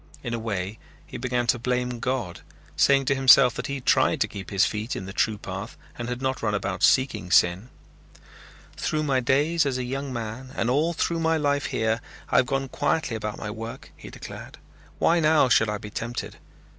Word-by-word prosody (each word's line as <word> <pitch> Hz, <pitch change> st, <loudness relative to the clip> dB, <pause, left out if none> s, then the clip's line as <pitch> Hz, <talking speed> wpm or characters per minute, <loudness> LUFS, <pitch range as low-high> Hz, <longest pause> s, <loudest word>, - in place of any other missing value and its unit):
In 115 Hz, -, -4 dB
a 115 Hz, -, -2 dB
way 100 Hz, -2 st, -4 dB, 0.3 s
he -, -, -8 dB
began 125 Hz, 0 st, -1 dB
to 120 Hz, 0 st, +2 dB
blame 125 Hz, 0 st, -1 dB
God, 120 Hz, -9 st, -2 dB, 0.4 s
saying 140 Hz, -1 st, +4 dB
to 135 Hz, -, +2 dB
himself 135 Hz, -2 st, +6 dB
that -, -, -5 dB
he 140 Hz, -, -3 dB
had 135 Hz, -, -8 dB
tried -, -, +3 dB
to -, -, +3 dB
keep 100 Hz, -1 st, -8 dB
his 95 Hz, -2 st, +3 dB
feet 110 Hz, +3 st, -3 dB
in 95 Hz, -, -5 dB
the 95 Hz, -, -8 dB
true 110 Hz, 0 st, +1 dB
path 95 Hz, +3 st, -7 dB, 0.2 s
and 120 Hz, 0 st, -5 dB
had 125 Hz, +1 st, -4 dB
not 130 Hz, 0 st, -1 dB
run 105 Hz, -2 st, 0 dB
about 100 Hz, -2 st, -3 dB
seeking 130 Hz, -9 st, +2 dB
sin. 90 Hz, +6 st, +3 dB, 1.1 s
"Through 155 Hz, 0 st, -1 dB
my 135 Hz, -3 st, +1 dB
days 145 Hz, +6 st, +2 dB
as 135 Hz, -3 st, -1 dB
a 130 Hz, -, -2 dB
young 135 Hz, +2 st, -4 dB
man 120 Hz, +2 st, -6 dB
and 120 Hz, -, 0 dB
all 155 Hz, +6 st, +2 dB
through 165 Hz, 0 st, -1 dB
my 165 Hz, 0 st, +2 dB
life 145 Hz, -2 st, 0 dB
here 110 Hz, -1 st, 0 dB, 0.3 s
I -, -, +4 dB
have 130 Hz, -, +4 dB
gone 135 Hz, 0 st, -1 dB
quietly 145 Hz, -1 st, -1 dB
about 105 Hz, -1 st, -4 dB
my 105 Hz, -, -5 dB
work," 115 Hz, +1 st, -8 dB
he -, -, -11 dB
declared. -, -, -10 dB, 0.4 s
"Why 170 Hz, +1 st, +3 dB
now 155 Hz, -4 st, +4 dB
should 115 Hz, -2 st, +4 dB
I 105 Hz, -, -2 dB
be 105 Hz, 0 st, -9 dB
tempted? 120 Hz, +2 st, -5 dB
125 Hz, 205 wpm, -25 LUFS, 110-135 Hz, 1.1 s, himself